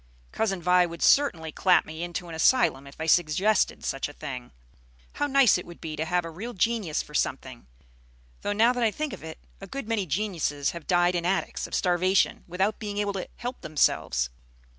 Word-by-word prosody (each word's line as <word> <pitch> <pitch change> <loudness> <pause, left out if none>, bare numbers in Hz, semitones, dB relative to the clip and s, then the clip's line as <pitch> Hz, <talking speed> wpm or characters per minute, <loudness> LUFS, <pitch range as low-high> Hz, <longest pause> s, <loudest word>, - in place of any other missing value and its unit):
Cousin 195 -5 -1
Vi 180 +1 +5
would 170 -1 -6
certainly 170 - +3
clap 185 +3 +3
me 160 +1 -8
into 175 0 -4
an 165 - -8
asylum 160 - +3
if 140 - -12
I 160 - -2
suggested 175 +6 +2
such 135 +1 -2
a - - -11
thing. 130 - -7 0.6
How 290 - -1
nice 270 -8 +5
it - - -8
would 175 - -11
be 155 -2 -5
to 155 - -2
have 175 +1 0
a 165 - -6
real 220 +9 -7
genius 210 -6 0
for 150 - -16
something! 130 - -2 0.7
Though 205 - -1
now 230 +4 +4
that 245 - -3
I 225 - +4
think 300 +6 -4
of - - -9
it, 160 0 -8 0.2
a 195 - -8
good 275 +3 -6
many 220 -5 -1
geniuses 160 -5 -1
have 170 -2 -9
died 175 0 +3
in 175 -1 -1
attics, 190 +3 -1
of - - -4
starvation, 185 +1 +2
without 190 +4 -1
being 205 -2 -5
able 205 -1 0
to 190 -2 -4
help 245 +1 -6
themselves." 80 - +1
180 Hz, 205 wpm, -26 LUFS, 160-210 Hz, 0.7 s, Vi